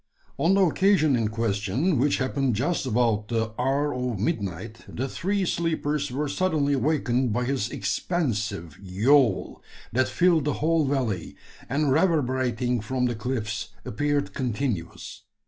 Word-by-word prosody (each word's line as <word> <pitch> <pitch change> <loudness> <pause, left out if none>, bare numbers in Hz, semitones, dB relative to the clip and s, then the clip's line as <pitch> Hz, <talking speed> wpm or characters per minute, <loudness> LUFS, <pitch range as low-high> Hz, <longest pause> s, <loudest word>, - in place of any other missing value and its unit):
On 180 +4 +3
the 195 - +4
occasion 175 -4 +3
in 115 -3 +1
question 110 - 0
which 140 +3 +2
happened 130 -2 0
just 140 - -1
about 115 -3 +1
the 115 -1 -1
hour 140 +3 +1
of 125 -3 -2
midnight 100 +1 -3
the 130 +3 -3
three 195 +7 -1
sleepers 150 -4 -1
were 145 +4 -2
suddenly 150 -4 +1
awakened 130 -4 +1
by 125 +4 0
his 125 -3 -1
expansive 110 - -2
"yowl," 110 +5 +2 0.3
that 130 +2 +2
filled 170 -5 +3
the 150 - +1
whole 160 0 +1
valley, 125 - -2 0.3
and 145 0 +1
reverberating 130 - +1
from 125 +3 -1
the 120 - 0
cliffs, 110 -3 -3
appeared 145 +5 -1
continuous. 120 -7 -3
130 Hz, 135 wpm, -25 LUFS, 115-150 Hz, 0.3 s, the